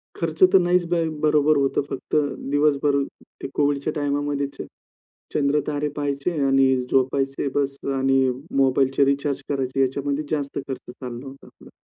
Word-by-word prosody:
खर्च 165 0 -1
तर 185 +1 +7
नाहीच 175 0 +2
ब 170 -1 +2 0.2
बरोबर 150 0 +4
होतं 135 - +1
फक्त 135 - -4 0.4
दिवसभर 145 -1 +2 0.5
ते - - -3
COVIDच्या 145 +1 +1
टाईमामध्ये 145 -1 -1 0.9
चंद्र 145 0 +2
तारे 150 0 -1
पहायचे 140 +3 -1
आणि 135 0 +4 0.3
झोपायचे 135 +1 +1
बस 140 -1 0 0.2
आणि 135 0 +2 0.4
मोबाईलचे 135 +1 +3
रिचार्ज 140 0 0
करायचे 135 -1 -2
ह्याच्यामध्ये 140 +2 0
जास्त 145 -2 -2
खर्च 130 -2 -6
चालला 125 0 -8
होता 135 +1 -12
तो. - - -18
140 Hz, 135 wpm, -23 LUFS, 135-150 Hz, 0.9 s, तर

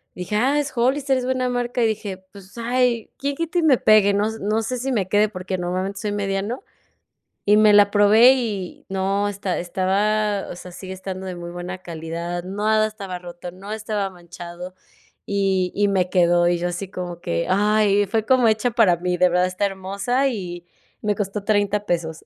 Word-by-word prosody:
Dije: 180 +3 -4
"Ah, 270 +7 +2
es 290 -2 -3
Hollister, 265 +3 +1
es 255 - -2
buena 255 -1 0
marca". 245 0 -1
Y - - +4
dije: 205 -3 -3 0.2
"Pues, 200 +2 -14
ay, 240 -1 0
quién 280 0 -2
quita 335 +2 -1
y - - 0
me 290 -5 +5
pegue". 210 -2 +5
No 205 +1 +1
s 220 0 -7
no 215 +2 0
sé 250 +3 -3
si 265 +3 -2
me 200 -7 0
quede, 210 +1 +3
porque 185 -1 -4
normalmente 185 +3 -3
soy 210 -2 -2
mediano 200 - -2 0.8
y 210 +1 +5
me 215 -1 +6
la 205 -1 +6
probé 215 +5 +6
y 210 -8 -4
no 195 +1 0
esta 200 -2 -3
estaba, 200 +3 0
o - - -7
sea, 180 - -10
sigue 190 +1 -8
estando 190 0 -6
de 185 -1 -5
muy 175 0 -7
buena 175 +1 -6
calidad, 170 0 -5
nada 215 +3 +1
estaba 195 -4 -6
roto, 175 0 -9
no 195 +4 -9
estaba 210 -2 -2
manchado 175 0 -10 0.5
y 195 -2 0
y 205 0 +2
me 185 -2 +1
quedó 175 -1 +3
y 175 -1 +1
yo 175 - -1
así 175 +2 -5
como 175 -2 -6
que: 85 - -2
"Ay, 205 0 +3
fue 220 +2 -1
como 255 -3 +4
hecha 220 +2 +1
para 210 -8 +4
mí, 180 +1 -1
de 180 +1 +5
verdad 180 +1 +2
está 185 +2 -2
hermosa", 200 +8 -1
y 175 -7 -5 0.4
me 210 -1 +1
costó 205 0 -3
$30 205 -1 +1
pesos. 165 -2 -2
200 Hz, 195 wpm, -22 LUFS, 180-220 Hz, 0.8 s, me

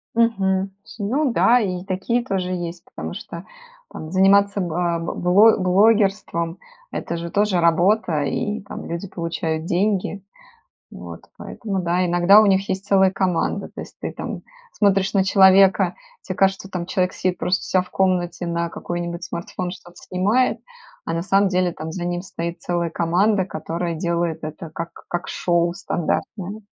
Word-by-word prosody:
Мгм. 195 -4 +1 0.3
Ну 250 +7 0
да, 245 +1 +5
и 185 -5 -2
такие 195 +6 -1
тоже 190 -5 -2
есть, 175 -1 -5
потому - - -5
что - - -8 0.5
там 155 - -8
заниматься 200 +2 +4
ба 170 0 -1
б 165 - -4
бло 200 +6 +5
блогерством- 195 -3 +2 0.3
это 170 - -4
же 170 0 -5
тоже 200 -1 +2
работа, 170 -1 +2
и 210 +9 -2
там 205 - -8
люди 170 +4 -5
получают 165 -3 -3
деньги. 195 +2 0 0.7
Вот, - - -10
поэтому, 195 -5 -4
да, 175 +1 +1
иногда 175 +4 +6
у 215 - +4
них 195 0 +2
есть 190 +1 -3
целая 190 -2 +4
команда, 190 +1 -1
то - - -6
есть - - -11
ты - - -4
там - - -6 0.3
смотришь 195 -1 +2
на 190 -1 +3
человека, 190 0 +5 0.3
тебе 185 - -5
кажется, 195 0 +1
там 175 -2 -4
человек 185 -1 0
сидит 185 -1 -2
просто 180 +1 0
у - - -6
ся 185 - +2
в 180 - -16
комнате 175 -2 0
на 170 0 -1
какой-нибудь 170 0 -5
смартфон 180 +1 -5
что-то 175 -1 -13
снимает, 210 +8 0 0.4
а 165 - -3
на 165 0 -1
самом 195 +1 +3
деле 180 -2 +1
там 160 0 -7
за 175 +1 -5
ним 175 0 -2
стоит 170 -2 -5
целая 170 -1 -1
команда, 185 +5 +2
которая 170 0 -4
делает 170 -1 -1
это 155 +1 -7
как 165 +2 -6 0.2
как 175 0 -3
шоу 170 -1 +1
стандартное. 195 +4 -3
185 Hz, 160 wpm, -22 LUFS, 170-195 Hz, 0.7 s, иногда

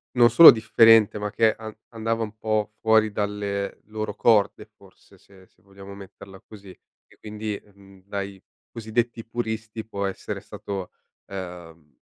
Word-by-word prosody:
non 120 -1 +6
solo 170 - +10
differente, 110 -1 +4
ma 105 0 -4
che 110 0 +2
an 110 -1 -10
andava 115 0 -3
un 110 0 -5
po' 110 -1 -2
fuori 110 -1 +3
dalle 100 -1 -3
loro 110 0 -5
corde 110 -4 +2
forse, - - -22
se 95 -1 -21
se - - -35
vogliamo 100 0 -13
metterla 100 0 -13
così, 100 -1 -15
e 90 - -21
quindi, 105 -1 -6
mhmm, 95 -1 -19
dai 100 -1 -6 0.3
cosiddetti 115 +1 -3
puristi 110 -1 -5
può 100 -2 -5
essere 95 - -5
stato, 95 -3 -7 0.3
ehm, 85 -6 -10
105 Hz, 145 wpm, -24 LUFS, 100-110 Hz, 0.3 s, solo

